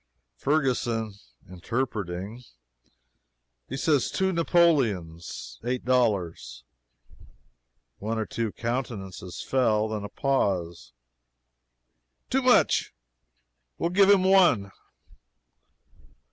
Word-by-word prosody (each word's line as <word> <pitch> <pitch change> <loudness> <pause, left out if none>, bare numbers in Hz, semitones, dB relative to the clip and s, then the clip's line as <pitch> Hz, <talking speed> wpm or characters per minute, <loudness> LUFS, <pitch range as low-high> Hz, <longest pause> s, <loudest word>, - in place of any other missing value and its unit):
] - - -53
Ferguson 125 -7 0 0.3
(interpreting) 105 +1 -4 1.3
"He 135 - -4
says 140 -1 +2
two 190 0 0
Napoleons 100 - 0
eight 125 0 -2
dollars." 100 - 0 1.4
One 110 +2 -3
or 110 - -1
two 115 -1 -3
countenances 105 -7 -5
fell. 110 -5 +1
Then 105 -1 -4
a 105 - -6
pause. 90 - -1 1.4
"Too 265 - +2
much! 250 -1 +3 0.8
we'll 170 - -1
give 195 +1 +5
him 200 -2 +6
one!" 175 - +4
115 Hz, 85 wpm, -26 LUFS, 95-135 Hz, 1.4 s, him